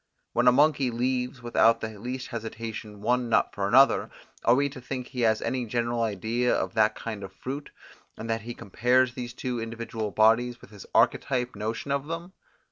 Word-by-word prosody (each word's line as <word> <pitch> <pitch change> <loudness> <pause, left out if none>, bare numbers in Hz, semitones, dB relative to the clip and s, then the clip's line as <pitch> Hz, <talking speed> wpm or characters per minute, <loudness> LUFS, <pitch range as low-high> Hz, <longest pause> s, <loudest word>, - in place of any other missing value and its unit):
When 120 +1 +2
a - - +9
monkey 145 0 +3
leaves 125 +1 -2
without 115 -1 +4
the 110 -2 -6
least 125 +4 -5
hesitation 110 -2 -6
one 125 +1 +1
nut - - +3
for 100 -1 -1
another, 135 +6 +5 0.3
are 120 - +5
we 140 +2 +2
to 135 -2 -9
think 125 0 -5
he 125 - -4
has 110 -2 +2
any 125 -2 -2
general 120 +1 -1
idea 115 +3 0
of - - -2
that 110 -1 +3
kind 110 -3 -6
of 95 - -7
fruit, 140 +8 -6 0.5
and 115 - -6
that 115 0 -1
he 120 +2 -7
compares 125 +5 +2
these 120 -1 -6
two 125 -3 -3
individual 115 -1 -4
bodies 115 +3 +3
with - - -16
his 100 -3 -12
archetype 125 -3 +2
notion 110 +6 -3
of 140 +1 -1
them? 165 +3 -5
120 Hz, 190 wpm, -27 LUFS, 110-125 Hz, 0.5 s, a